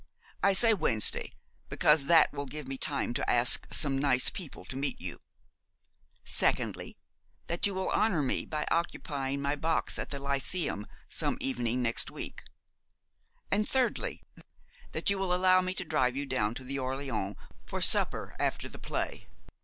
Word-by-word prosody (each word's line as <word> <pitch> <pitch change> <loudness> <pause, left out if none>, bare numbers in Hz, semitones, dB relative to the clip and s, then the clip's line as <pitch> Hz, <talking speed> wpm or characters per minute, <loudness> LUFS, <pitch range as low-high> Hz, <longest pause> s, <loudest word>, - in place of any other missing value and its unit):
I 200 - +4
say 225 +3 +5
Wednesday 115 - +2 0.4
because 150 -2 +4
that 165 +2 +5
will 140 -1 -5
give 150 +1 -5
me 135 - -4
time 140 -2 -1
to - - -2
ask 120 0 +2
some 135 -3 +3
nice 130 -3 +3
people 175 -7 -8
to 130 - -8
meet 140 +1 -1
you; - - -6 1.0
secondly, - - 0 0.5
that 170 +4 +1
you 200 - -4
will 190 0 -2
honour 185 -9 +2
me 130 - -1
by 150 -1 -2
occupying 140 -4 -2
my 140 +1 0
box 160 +2 -1
at - - -4
the 140 - -4
Lyceum 140 - -1 0.2
some - - 0
evening 125 -1 -1
next 115 -1 0
week; - - -7 1.1
and 210 +2 +1
thirdly, 260 -2 0 0.7
that - - +1
you 200 - -1
will 185 -2 +1
allow 185 0 +4
me 185 0 -3
to 190 - -2
drive 130 -5 +1
you 140 - -2
down 120 -5 -1
to 130 - -7
the 135 +2 -3
Orleans 130 -7 -3 0.3
for - - -3
supper - - +3
after - - -1
the - - -11
play. - - -4
140 Hz, 160 wpm, -30 LUFS, 130-180 Hz, 1.1 s, say